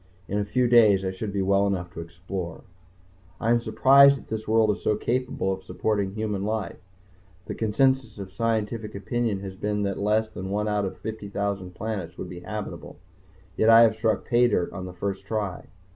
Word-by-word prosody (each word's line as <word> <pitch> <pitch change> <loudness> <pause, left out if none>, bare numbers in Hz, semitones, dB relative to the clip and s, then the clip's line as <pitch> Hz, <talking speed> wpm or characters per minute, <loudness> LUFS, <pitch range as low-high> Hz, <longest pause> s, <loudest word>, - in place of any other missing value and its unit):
In 100 - -1
a 100 - -1
few 120 +5 +1
days 110 -5 +5
I 95 - -1
should 100 +2 -5
be 100 -1 -1
well 100 +1 +3
enough 90 -3 -3
to - - -8
explore.... 90 +1 -6 0.8
I 115 - +1
am 120 0 +3
surprised 135 +5 +6
that - - -14
this 110 0 -4
world 110 -1 +4
is 105 - -5
so 105 - +1
capable 120 -4 -1
of 95 - -7
supporting 100 -1 -2
human 105 -3 -2
life. 110 -1 -3 0.7
The - - -5
consensus 120 +1 +1
of 95 -2 -7
scientific 110 0 -2
opinion 105 0 -2
has 95 -1 -7
been 105 +1 -2
that 100 -1 -2
less 105 +2 +1
than 95 -3 -7
one 105 +2 -1
out 105 -1 0
of 95 0 -5
50,000 100 -3 -4
planets 100 -7 -5
would 90 - -6
be 90 - -8
habitable. 105 +3 -7 0.6
Yet 110 - +3
I 115 0 +9
have 110 -2 +5
struck 110 0 0
paydirt 120 -7 +2
on 95 -2 -6
the 90 - -8
first 100 +2 -4
try. 105 -4 -3
105 Hz, 190 wpm, -25 LUFS, 95-110 Hz, 0.8 s, I